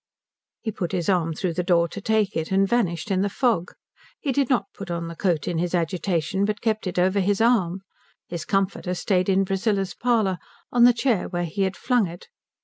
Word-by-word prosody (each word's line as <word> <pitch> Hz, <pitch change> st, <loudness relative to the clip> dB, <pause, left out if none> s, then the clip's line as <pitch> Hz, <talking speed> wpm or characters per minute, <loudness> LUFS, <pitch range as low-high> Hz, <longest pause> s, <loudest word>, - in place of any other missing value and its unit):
He 220 Hz, -, -3 dB
put 185 Hz, -2 st, -4 dB
his 180 Hz, 0 st, -1 dB
arm 165 Hz, -4 st, +1 dB
through 175 Hz, +1 st, -2 dB
the 180 Hz, -, -1 dB
door 170 Hz, -1 st, +3 dB
to 200 Hz, -, -7 dB
take 215 Hz, -1 st, +1 dB
it, 160 Hz, +2 st, -2 dB
and 195 Hz, +1 st, +3 dB
vanished 195 Hz, -5 st, 0 dB
in 190 Hz, -1 st, +2 dB
the 200 Hz, -, +1 dB
fog. 210 Hz, -5 st, 0 dB, 0.5 s
He 285 Hz, -, -1 dB
did 270 Hz, 0 st, +1 dB
not 255 Hz, -4 st, 0 dB
put 200 Hz, -, -8 dB
on 170 Hz, -1 st, -3 dB
the 165 Hz, -, -7 dB
coat 170 Hz, -5 st, 0 dB
in 170 Hz, -2 st, -1 dB
his 175 Hz, +1 st, 0 dB
agitation, 175 Hz, +1 st, 0 dB
but 210 Hz, +1 st, -1 dB
kept 220 Hz, -3 st, -1 dB
it 180 Hz, -, -4 dB
over 185 Hz, +3 st, +3 dB
his 200 Hz, +1 st, +1 dB
arm. 195 Hz, -6 st, +2 dB, 0.5 s
His 170 Hz, -3 st, -5 dB
comforter 195 Hz, -2 st, -1 dB
stayed 185 Hz, 0 st, +1 dB
in 195 Hz, 0 st, +3 dB
Priscilla's 195 Hz, -1 st, 0 dB
parlour, 220 Hz, -7 st, +1 dB, 0.3 s
on 240 Hz, -1 st, +6 dB
the 245 Hz, -, +7 dB
chair 235 Hz, -4 st, 0 dB
where 175 Hz, -1 st, -2 dB
he 170 Hz, +4 st, -4 dB
had 190 Hz, 0 st, -3 dB
flung 245 Hz, -6 st, +2 dB
it. 170 Hz, +1 st, -11 dB
190 Hz, 215 wpm, -24 LUFS, 175-215 Hz, 0.5 s, the